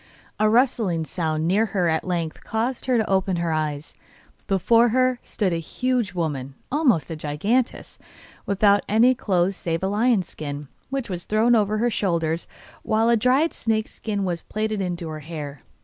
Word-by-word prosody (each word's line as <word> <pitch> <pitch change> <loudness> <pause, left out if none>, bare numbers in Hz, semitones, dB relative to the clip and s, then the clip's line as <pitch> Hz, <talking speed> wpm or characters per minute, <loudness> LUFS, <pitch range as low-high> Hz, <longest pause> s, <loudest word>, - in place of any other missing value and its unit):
A 215 0 +4
rustling 220 -8 +2
sound 160 -1 -2
near 210 +5 +3
her 180 -2 +3
at 160 -1 +1
length 170 -3 -3
caused 235 +4 -2
her 255 -2 +3
to 220 - +1
open 190 -1 +1
her 170 -1 -1
eyes; 155 -1 -2 0.5
before 230 +5 +4
her 255 +1 +2
stood 190 -5 -1
a - - 0
huge 245 +4 -1
woman, 140 -6 -3 0.2
almost 250 - +2
a - - -3
giantess, 180 - -1 0.5
without 200 0 +4
any 230 +5 +5
clothes 190 -6 0
save 165 0 -3
a - - +2
lion's 210 -2 +2
skin, 145 -2 -7 0.2
which 270 -2 -3
was 175 -3 -5
thrown 220 +3 +3
over 215 -1 +2
her 240 +2 +1
shoulders, 170 -5 -1 0.3
while 220 +1 +2
a 235 - +5
dried 255 +8 +2
snake's 220 -1 -1
skin 205 -3 -3
was 175 -2 -2
plaited 215 -1 -2
into 175 -2 -3
her 155 -1 -5
hair. 150 -3 -7
195 Hz, 170 wpm, -23 LUFS, 165-230 Hz, 0.5 s, any